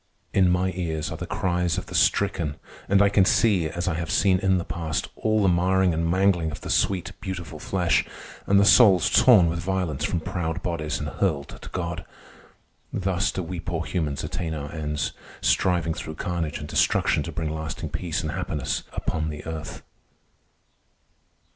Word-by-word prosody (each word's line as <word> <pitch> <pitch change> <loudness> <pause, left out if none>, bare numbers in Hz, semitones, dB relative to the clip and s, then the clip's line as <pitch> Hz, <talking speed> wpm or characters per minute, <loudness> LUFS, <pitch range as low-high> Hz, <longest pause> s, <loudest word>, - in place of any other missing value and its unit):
In 95 -2 +4
my 90 +1 +1
ears 80 -4 -3
are 80 - -5
the 90 +2 -6
cries 90 -2 0
of - - -3
the - - -11
stricken; 85 -7 +1 0.3
and 100 +1 +5
I 100 - +4
can 100 -1 +4
see, 95 -4 +3
as 85 +3 -4
I 90 - +1
have 80 0 -4
seen 95 -2 +3
in 95 -1 +2
the 85 - -3
past, 80 -2 -3
all 110 -1 +1
the - - +4
marring 90 +1 +3
and 85 +1 0
mangling 90 -2 +2
of - - -7
the - - -4
sweet, 95 -3 +1
beautiful 90 -6 -6
flesh, 90 +1 +1 0.4
and 100 0 +5
the 100 - +5
souls 100 -6 +6
torn 105 -9 +6
with 85 +1 -1
violence 85 -5 -2
from 85 +2 0
proud 90 -1 -3
bodies 75 -3 -2
and 75 - -4
hurled 75 -4 -1
to - - -10
God. 85 -2 -4 0.9
Thus 95 -1 0
do 95 - -3
we 85 +1 -5
poor 85 0 -3
humans 75 -5 -2
attain 80 +1 -3
our 75 -1 -6
ends, 75 -2 -2 0.3
striving 85 -3 +2
through 80 0 -6
carnage 85 -4 -3
and 75 - -7
destruction - - +2
to - - -5
bring 80 -2 -3
lasting 80 -1 -5
peace 85 -2 -3
and 80 - -2
happiness 75 -1 -2
upon 80 0 -2
the 75 -1 -7
earth. 80 -1 -6
85 Hz, 180 wpm, -25 LUFS, 80-95 Hz, 0.9 s, souls